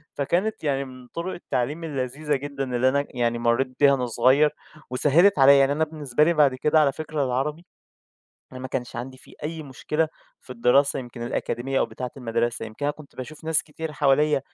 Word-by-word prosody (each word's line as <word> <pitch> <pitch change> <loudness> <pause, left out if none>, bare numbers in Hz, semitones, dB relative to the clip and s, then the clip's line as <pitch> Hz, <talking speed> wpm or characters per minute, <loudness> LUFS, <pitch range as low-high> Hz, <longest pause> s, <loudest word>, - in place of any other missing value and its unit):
فكانت 175 +10 -1
يعني 140 -2 0
من 130 -1 -12
طُرُق 170 +7 -5
التعليم 145 +1 -3
اللذيذة 145 0 -2
جدًا 135 -2 -4
اللي 125 +2 +3
أنا 140 +2 0
يعني 120 -1 -1
مرّيت 120 +2 0
بيها 140 -1 +6
وأنا 130 -2 0
صغيّر، 130 +6 +4 0.4
وسهِّلت 150 +8 +4
عليَّ، 140 +1 +8
يعني 135 0 +4
أنا 150 +2 +1
بالنسبة 150 -3 0
لي 170 +2 +3
بَعد 145 -5 +4
كده 150 +4 +2
على 145 -2 +4
فكرة 155 0 -3
العربي 145 +6 -2 0.9
أنا 130 - -8
ما 130 - -6
كانش 125 -1 -4
عَندي 130 +2 -6
فيه - - -17
أي 160 +1 -4
مشكلة 150 +3 -2 0.3
في - - -18
الدراسة 125 +4 +3
يمكن 120 -2 -8
الأكاديمية 125 +2 -2
أو - - +2
بتاعة 125 -1 -6
المدرسة، 120 -2 -2
يمكن 110 +6 -7
أنا 145 - +1
كنت 150 -2 -16
باشوف 150 +5 -9
ناس 160 -1 +2
كتير 160 0 -7
حواليّ 150 0 +3
140 Hz, 190 wpm, -24 LUFS, 125-150 Hz, 0.9 s, عليَّ